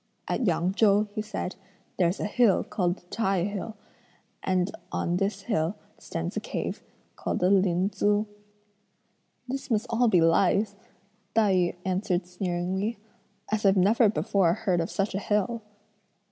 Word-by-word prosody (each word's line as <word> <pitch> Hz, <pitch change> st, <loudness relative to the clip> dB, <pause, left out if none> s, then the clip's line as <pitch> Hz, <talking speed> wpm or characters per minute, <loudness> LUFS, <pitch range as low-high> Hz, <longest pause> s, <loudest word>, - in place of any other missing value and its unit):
"At 240 Hz, -, 0 dB
Yang 175 Hz, +2 st, +1 dB
Chou," 210 Hz, 0 st, +4 dB
he 215 Hz, -, -2 dB
said, 210 Hz, -4 st, -4 dB, 0.4 s
"there's 175 Hz, +1 st, +2 dB
a -, -, -1 dB
hill 215 Hz, -1 st, +3 dB
called 175 Hz, -3 st, -1 dB
the 180 Hz, -, -22 dB
Tai 195 Hz, -5 st, +1 dB
hill; 205 Hz, +2 st, -4 dB, 0.7 s
and 185 Hz, 0 st, 0 dB, 0.2 s
on 175 Hz, 0 st, 0 dB
this 195 Hz, +3 st, -1 dB
hill 170 Hz, -4 st, 0 dB, 0.2 s
stands -, -, -4 dB
a -, -, 0 dB
cave -, -, -4 dB, 0.3 s
called -, -, -2 dB
the 180 Hz, +2 st, +2 dB
Lin 185 Hz, -1 st, +3 dB
Tzu." 205 Hz, +2 st, +1 dB, 1.2 s
"This 270 Hz, +2 st, -4 dB
must 220 Hz, -3 st, +1 dB
all 240 Hz, +1 st, +3 dB
be 185 Hz, -6 st, +4 dB
lies," 195 Hz, +5 st, +3 dB, 0.6 s
Tai 215 Hz, -3 st, +4 dB
yü 180 Hz, -2 st, +2 dB
answered 185 Hz, -1 st, 0 dB
sneeringly, 180 Hz, +4 st, -2 dB, 0.5 s
"as 215 Hz, -1 st, 0 dB
I've 195 Hz, -1 st, +4 dB
never 210 Hz, +4 st, +5 dB
before 195 Hz, -4 st, +2 dB
heard 190 Hz, -6 st, 0 dB
of 165 Hz, -, -3 dB
such 195 Hz, 0 st, -1 dB
a 195 Hz, -, -1 dB
hill." 210 Hz, +3 st, 0 dB
195 Hz, 150 wpm, -27 LUFS, 180-215 Hz, 1.2 s, never